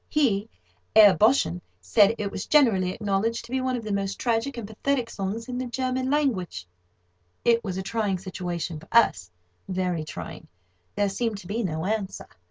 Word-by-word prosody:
He 225 -8 +1 0.5
(Herr 205 -4 +9
Boschen) 210 - +3 0.2
said 195 - +4
it 200 -1 -3
was 190 - -5
generally 225 -12 +4
acknowledged 215 +3 -1
to 235 - -14
be 260 0 0
one 255 0 0
of 240 - -4
the 215 - -4
most 195 0 -2
tragic 240 +3 -1
and 225 -4 -5
pathetic 240 +2 -1
songs 205 +4 -4
in 250 -1 -4
the 255 - -3
German 255 +1 -1
language. 210 - 0 0.8
It 230 -1 +4
was 190 -3 -4
a 190 - -3
trying 205 -1 -1
situation 175 -3 -4
for - - -16
us—very 155 - 0
trying. - - -8 0.5
There 205 - +2
seemed 215 +2 -2
to 200 - -11
be 215 +5 -2
no 160 -5 -2
answer. 205 -1 -2
205 Hz, 175 wpm, -26 LUFS, 185-235 Hz, 0.8 s, Herr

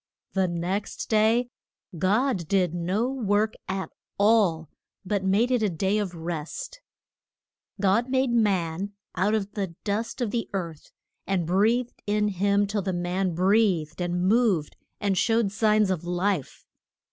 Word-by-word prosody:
The 190 -1 +2
next 180 +4 -3
day 225 +3 +3 0.5
God 195 - +1
did 180 -3 +1
no 185 +7 0
work 215 -5 0
at 190 0 -3 0.3
all, 200 -7 +3 0.4
but 200 0 -1
made 205 +6 +2
it 250 -2 +2
a 210 - +2
day 190 +5 0
of 190 -4 -3
rest. 170 - -6 1.0
God 205 +6 +2
made 260 -1 +1
man 200 -4 0 0.2
out 205 +4 +2
of 205 -2 -2
the 195 -6 -4
dust 220 +4 -2
of 240 -5 -1
the 235 -1 -2
earth, 170 -5 -5 0.4
and 190 -4 0
breathed 220 +8 +1
in 210 0 +1
him 200 +1 +2
till 205 +1 -2
the 190 0 -2
man 175 0 -1
breathed 185 -4 +2
and 175 0 -1
moved, 200 -6 +2 0.2
and 200 -2 0
showed 225 -3 +2
signs 215 -1 +3
of 180 -3 -2
life. 180 -3 -2
200 Hz, 145 wpm, -26 LUFS, 180-215 Hz, 1.0 s, day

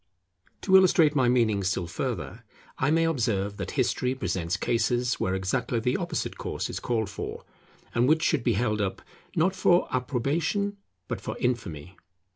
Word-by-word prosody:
To 190 - +3
illustrate 175 -5 +6
my 130 -4 +3
meaning 110 -5 +2
still 95 -1 0
further, 85 - -4 0.4
I 130 - +2
may 165 +1 +3
observe 110 -10 0
that 95 -2 -4
history 130 0 +1
presents 90 -5 -2
cases 120 +3 0
where 95 0 0
exactly 115 +5 -1
the 125 +2 0
opposite - - -3
course - - -3
is - - -4
called 115 -3 -1
for, - - -6 0.5
and 120 +3 +3
which 160 +1 +3
should 155 -7 +2
be - - +2
held 105 0 0
up 95 -2 -3 0.3
not 185 +4 +2
for 175 -1 +3
approbation 145 - -1 0.3
but - - -4
for - - -5
infamy. 95 - -3
120 Hz, 160 wpm, -27 LUFS, 100-145 Hz, 0.5 s, illustrate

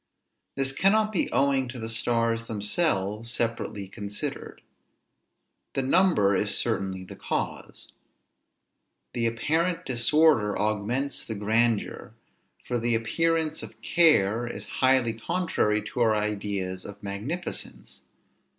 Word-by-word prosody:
This 135 -1 +1
cannot 215 +8 +3
be 190 - 0
owing 135 -1 +2
to 125 +1 -7
the 110 -1 -5
stars 115 0 +1
themselves, 105 - -1
separately 115 -4 -2
considered. 100 +1 -5 1.1
The 135 - 0
number 135 - +3
is - - +2
certainly 95 -1 -1
the 90 - -10
cause. - - -4 1.2
The 115 -1 +1
apparent 160 +9 0
disorder 125 -2 +3
augments 110 +7 -1
the 110 - -5
grandeur, 110 +2 0 0.5
for 120 - -1
the 120 0 +1
appearance 160 +7 0
of - - -10
care 120 - +3
is 105 -3 -5 0.2
highly 130 -3 +4
contrary 110 - 0
to 105 +4 -6
our 110 -2 +4
ideas 100 -3 -2
of 100 0 -10
magnificence. 110 - -4
115 Hz, 115 wpm, -26 LUFS, 105-140 Hz, 1.2 s, highly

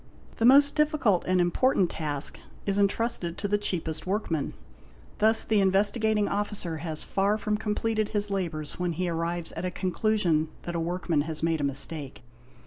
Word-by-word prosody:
'The 225 - +1
most 280 +3 +7
difficult 300 - +2
and 185 0 +3
important 180 +3 +2
task 150 -4 -4 0.3
is 200 0 +2
entrusted 200 -3 0
to 205 - -2
the 205 - +1
cheapest 160 -5 -3
workman. 185 -7 -1 0.6
Thus 220 +1 +4
the 215 -2 +2
Investigating 205 +2 +2
Officer 200 -5 -2
has 155 -1 -5
far 200 +2 +1
from 215 -1 -1
completed 215 0 -1
his 205 -1 -1
labours 165 -6 -3
when 180 -1 0
he 180 +3 -2
arrives 170 0 -2
at - - -6
a 185 - 0
conclusion 180 -4 0
that 175 - -4
a - - 0
workman 170 -2 0
has 155 -1 -4
made 165 -2 +1
a - - -1
mistake. 140 0 -3
185 Hz, 165 wpm, -27 LUFS, 165-210 Hz, 0.6 s, most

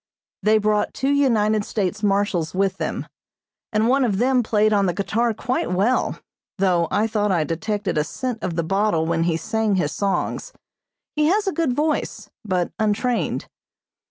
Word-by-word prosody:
They 215 +1 +4
brought 210 0 0
two 270 +1 0
United 220 -7 +2
States 205 -1 -2
marshals 195 -5 0
with 195 0 +1
them, - - -3 0.7
and 215 0 +2
one 265 +2 +3
of 210 -6 +1
them 255 +3 +3
played 215 -1 +2
on 200 -2 +3
the 175 - -1
guitar 230 +5 0
quite 235 -2 -2
well, 205 +8 +1 0.4
though 180 -3 +2
I 210 - +1
thought 210 -2 0
I 170 -4 +2
detected 195 +3 -2
a - - +2
scent 245 +6 -4
of 170 - -3
the 170 - 0
bottle 195 -2 +1
when 165 0 0
he 165 -2 +1
sang 220 +2 0
his 185 - 0
songs. 200 - -2 0.6
He 300 0 +2
has 410 +5 +2
a 385 - +1
good 325 -7 0
voice, 300 +3 -2
but 185 -4 -1
untrained. 220 +3 0
210 Hz, 170 wpm, -22 LUFS, 190-240 Hz, 0.7 s, They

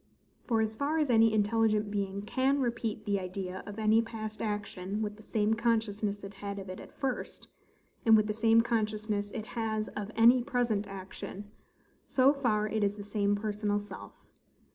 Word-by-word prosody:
For 225 -3 +2
as 220 0 -1
far 285 +6 0
as 300 -5 +2
any 225 -1 +6
intelligent 215 0 +2
being 200 -1 -2
CAN 265 +6 +1
repeat 230 -4 -2
the 200 -2 +1
idea 185 0 -5
of 205 +1 -7
any 220 +1 +4
past 220 -1 -6
action 205 -1 -3
with 210 -1 -3
the 215 - -15
same 215 0 +1
consciousness 220 -3 0
it 200 0 -7
had 200 0 -6
of 195 -1 -7
it 185 - -6
at - - -11
first, 265 -2 -3 0.6
and 225 -1 +7
with 215 - +3
the 210 - -1
same 225 +1 +5
consciousness 215 -2 -1
it 215 0 -5
has 220 -2 -2
of 210 0 -5
any 235 +3 +6
present 235 -4 0
action; 195 +1 -8 0.6
so 265 +2 +4
far 220 -7 +1
it 215 0 -1
is 200 0 +1
the 205 - -6
same 205 0 +1
personal 205 0 -1
self. 205 -2 -11
215 Hz, 180 wpm, -30 LUFS, 205-225 Hz, 0.6 s, and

